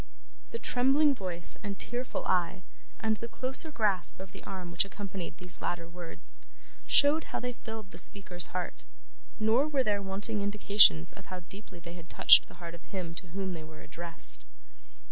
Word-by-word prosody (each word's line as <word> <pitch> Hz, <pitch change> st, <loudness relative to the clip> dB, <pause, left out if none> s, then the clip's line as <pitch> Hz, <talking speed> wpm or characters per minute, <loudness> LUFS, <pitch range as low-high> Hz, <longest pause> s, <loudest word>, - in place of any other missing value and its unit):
The 465 Hz, -, -5 dB
trembling 280 Hz, -, +3 dB
voice 180 Hz, -7 st, -4 dB
and 200 Hz, -2 st, -5 dB
tearful 245 Hz, +5 st, +1 dB
eye, 185 Hz, 0 st, 0 dB, 0.4 s
and 220 Hz, -1 st, 0 dB
the 230 Hz, -, -6 dB
closer 260 Hz, +6 st, 0 dB
grasp 210 Hz, -, -1 dB
of 190 Hz, -1 st, -9 dB
the -, -, -12 dB
arm 185 Hz, -3 st, -7 dB
which 175 Hz, -, +3 dB
accompanied 195 Hz, -4 st, -7 dB
these 180 Hz, -1 st, +2 dB
latter 170 Hz, -1 st, -3 dB
words, 170 Hz, 0 st, -12 dB, 0.5 s
showed 295 Hz, +3 st, +5 dB
how -, -, -4 dB
they 250 Hz, 0 st, -4 dB
filled 220 Hz, -4 st, -9 dB
the -, -, -2 dB
speaker's 180 Hz, -3 st, +1 dB
heart; 180 Hz, -1 st, -5 dB, 0.6 s
nor 225 Hz, +7 st, +3 dB
were 280 Hz, -4 st, +1 dB
there 205 Hz, -3 st, 0 dB
wanting 200 Hz, +2 st, -1 dB
indications 200 Hz, -, +5 dB
of 195 Hz, -, -14 dB
how 185 Hz, -1 st, -7 dB
deeply 190 Hz, +1 st, -12 dB
they 170 Hz, 0 st, -10 dB
had 170 Hz, -1 st, -12 dB
touched -, -, +7 dB
the -, -, -15 dB
heart 170 Hz, -1 st, -9 dB
of 170 Hz, -, -11 dB
him 180 Hz, -4 st, -6 dB
to 180 Hz, +2 st, -9 dB
whom 190 Hz, +2 st, -4 dB
they 160 Hz, -2 st, -7 dB
were 155 Hz, 0 st, -13 dB
addressed. 170 Hz, 0 st, -3 dB
195 Hz, 180 wpm, -30 LUFS, 175-220 Hz, 0.6 s, touched